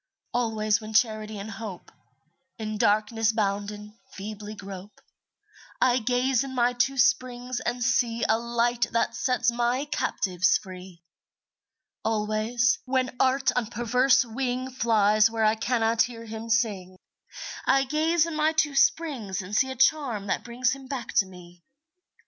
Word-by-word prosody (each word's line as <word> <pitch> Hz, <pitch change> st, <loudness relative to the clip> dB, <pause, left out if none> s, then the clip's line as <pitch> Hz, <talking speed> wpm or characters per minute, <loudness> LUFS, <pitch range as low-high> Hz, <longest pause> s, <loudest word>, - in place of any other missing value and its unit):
Always 220 Hz, -3 st, 0 dB
when 215 Hz, 0 st, -8 dB
Charity 215 Hz, -1 st, +1 dB
and 200 Hz, +2 st, -7 dB
Hope, 200 Hz, -3 st, -8 dB, 0.7 s
In 215 Hz, -2 st, -4 dB
darkness 215 Hz, +2 st, +2 dB
bounden, 210 Hz, 0 st, -3 dB
feebly 210 Hz, +1 st, -7 dB
grope, 195 Hz, 0 st, -10 dB, 0.8 s
I 255 Hz, 0 st, +3 dB
gaze 250 Hz, +2 st, +1 dB
in 265 Hz, -1 st, -7 dB
my 245 Hz, 0 st, +2 dB
two 265 Hz, +2 st, 0 dB
springs 250 Hz, -1 st, +1 dB
and 245 Hz, 0 st, -2 dB
see 235 Hz, -2 st, +1 dB
A 220 Hz, +1 st, +2 dB
Light 235 Hz, +1 st, 0 dB
that 230 Hz, -, +1 dB
sets 250 Hz, -1 st, +1 dB
my 240 Hz, +3 st, 0 dB
captives 185 Hz, -, +1 dB
free. 185 Hz, -2 st, -12 dB, 1.0 s
Always, 220 Hz, +3 st, +1 dB
when 255 Hz, -1 st, -1 dB
Art 265 Hz, +1 st, +3 dB
on 245 Hz, -3 st, 0 dB
perverse 250 Hz, +4 st, +2 dB
wing 255 Hz, +2 st, -3 dB
Flies 215 Hz, -3 st, +3 dB
where 225 Hz, -1 st, 0 dB
I 215 Hz, -, +4 dB
cannot 225 Hz, 0 st, +1 dB
hear 230 Hz, -1 st, -2 dB
him 225 Hz, +1 st, -7 dB
sing, 205 Hz, -6 st, 0 dB, 0.7 s
I 270 Hz, 0 st, +4 dB
gaze 310 Hz, +4 st, +1 dB
in 335 Hz, -, -5 dB
my 310 Hz, +1 st, +2 dB
two 310 Hz, -2 st, +1 dB
springs 265 Hz, -, +1 dB
and 195 Hz, +3 st, -6 dB
see 265 Hz, +4 st, +3 dB
A 260 Hz, -, -5 dB
charm 260 Hz, -6 st, +1 dB
that 195 Hz, -, -2 dB
brings 245 Hz, +1 st, 0 dB
him 270 Hz, 0 st, -6 dB
back 255 Hz, -4 st, -5 dB
to 195 Hz, -, +4 dB
me. 175 Hz, -1 st, -14 dB
230 Hz, 145 wpm, -26 LUFS, 215-255 Hz, 1.0 s, I